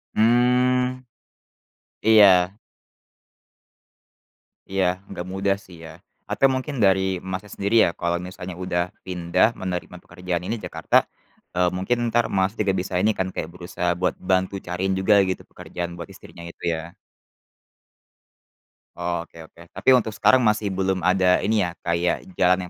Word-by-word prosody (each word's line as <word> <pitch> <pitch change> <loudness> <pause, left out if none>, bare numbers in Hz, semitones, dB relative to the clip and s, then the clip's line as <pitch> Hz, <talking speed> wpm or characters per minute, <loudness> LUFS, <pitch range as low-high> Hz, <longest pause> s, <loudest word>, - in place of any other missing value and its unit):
Mmm. 125 +2 +2 1.0
Iya. 100 -3 +6 2.1
Iya, 95 -1 +1 0.2
nggak 90 -2 -6
mudah 95 0 +1
sih 90 - -14
ya. - - -9 0.4
Atau 135 - +4
mungkin 130 +3 -3
dari 95 0 +4 0.3
Masnya 95 +2 -5
sendiri 100 +3 -1
ya, - - +1
kalau 85 0 0
misalnya 90 -1 -8
udah 90 -1 0 0.2
pindah 90 +1 +2
menerima 90 -1 -4
pekerjaan 90 0 -4
ini 115 - -2
Jakarta, - - -2 0.6
eee, 90 0 +3
mungkin 120 +6 0
entar 120 +1 +2
Mas 95 +2 +1
juga 100 -2 +1
bisa 95 +1 -5
ini 110 +2 +3
kan, 95 - 0
kayak 80 - -4
berusaha 90 0 -3
buat 90 - +1
bantu 95 +1 0
cariin 90 +2 -1
juga 100 +3 +3 0.2
gitu 95 - -3
pekerjaan 85 -1 -6
buat 85 - -8
istrinya 85 - -13
itu - - -16
ya? 80 +1 -7 2.0
Oke 85 -1 -5
oke. 85 +2 -16
Tapi - - +1
untuk 115 -4 +3
sekarang 130 - +4
masih 105 -4 +1
belum 95 -1 -1
ada 95 0 +3
ini 110 0 +2
ya, 85 - -8
kayak 85 - -1
jalan 90 +1 +4
95 Hz, 140 wpm, -23 LUFS, 90-105 Hz, 2.1 s, Iya